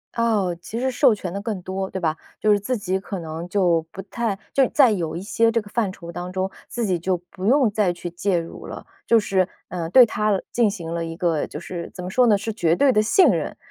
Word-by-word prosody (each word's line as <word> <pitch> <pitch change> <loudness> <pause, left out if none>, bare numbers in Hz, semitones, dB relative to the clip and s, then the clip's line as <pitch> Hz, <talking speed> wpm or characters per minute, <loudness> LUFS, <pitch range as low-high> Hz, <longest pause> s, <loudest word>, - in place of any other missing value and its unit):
哦， 210 -7 +1
其 230 +6 -5
实 260 - 0
授 255 -1 +4
权 190 -4 -5
得 200 - -4
更 210 -4 -4
多， 190 +1 -4
对 190 - -4
吧。 160 -2 0 0.2
就 215 - +1
是 205 - +4
自 250 +5 -2
己 190 -2 -1
可 195 -1 -6
能 165 +1 -6
就 175 -5 +2
不 195 - -7
太 215 -2 -3
就 270 - +4
在 260 -6 +5
有 170 -6 -2
一 175 - -4
些 225 +3 +2
这 230 -1 +1
个 205 - -14
范 215 -5 0
畴 170 -2 -11
当 175 +1 -6
中， 190 +1 -1 0.2
自 235 -2 -2
己 185 -3 +1
就 180 +2 -1
不 185 +1 -7
用 260 0 +4
再 205 -3 +1
去 175 0 -6
介 180 +1 0
入 165 0 -8
了。 - - -8 0.2
就 230 -1 +5
是， 190 -3 +1 0.2
呃， 170 -2 -4
对 250 +6 +8
他 210 -3 0
进 230 -4 +3
行 170 -5 -6
了 170 0 -2
一 165 0 -6
个 165 -4 0
就 150 - -8
是 170 -1 -7
怎 180 - -8
么 180 - -4
说 250 +5 +3
呢， 210 -3 +5
是 220 +2 -4
绝 170 -6 +2
对 275 +6 +4
地 215 - +4
信 295 - +5
任。 - - -1
195 Hz, 270 characters per minute, -23 LUFS, 175-220 Hz, 0.2 s, 对